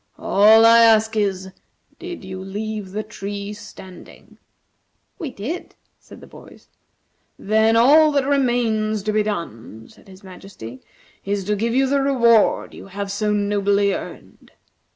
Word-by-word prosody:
All 220 +3 +5
I 230 0 +7
ask 220 -1 +4
is, 190 -3 -2 0.5
did 355 - -8
you 190 0 -7
leave 210 +1 -6
the 215 +2 -4
tree 205 -1 -7
standing?" 185 -3 -14 0.8
"We 320 -7 -5
did," 260 - -7 0.2
said - - -16
the - - -12
boys. - - -17 0.7
"Then 220 +2 +1
all 300 +7 +5
that 280 -2 +1
remains 235 -6 0
to 215 0 -2
be 215 - +2
done," 115 - -6
said - - -21
His 190 0 -16
Majesty, 180 - -12 0.4
"is 200 0 -3
to 210 +2 -1
give 230 +3 -2
you 270 +1 +3
the 275 +1 0
reward 235 -5 +2
you - - -12
have 195 +1 -6
so 210 +1 -1
nobly 205 -1 0
earned. - - -10
210 Hz, 145 wpm, -20 LUFS, 195-230 Hz, 0.8 s, I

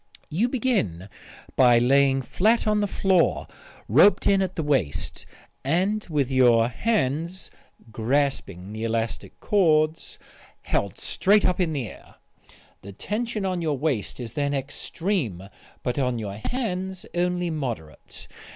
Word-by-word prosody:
You 210 +11 +1
begin 205 - -1 0.5
by 125 -2 +6
lying 135 +2 +3
flat 220 - +2
on 210 -1 +2
the 205 - +1
floor 190 -2 +2 0.4
roped 205 - +5
in 195 -1 +4
at 185 -1 -2
the 160 - -2
waist, 130 - -1 0.4
and 190 +9 0
with 140 -4 0
your 120 -3 +4
hands 170 - -1 0.4
(grasping 110 -6 -1
the 110 +1 -5
elastic 115 0 -3
cords) 160 -5 +1 0.5
held - - -1
straight 205 +2 +2
up 180 - +1
in 175 -3 +1
the 135 -6 -3
air. - - -14 0.7
The 100 +1 -10
tension 215 - -3
on 185 -2 -1
your 155 -4 -1
waist 130 -7 -2
is 120 -2 -6
then 145 -1 -1
extreme 140 - -3 0.4
but 125 +3 -1
on 125 -3 0
your 100 -3 -5
hands 190 - -3
only 180 0 0
moderate. 120 - -6
150 Hz, 135 wpm, -25 LUFS, 120-190 Hz, 0.7 s, by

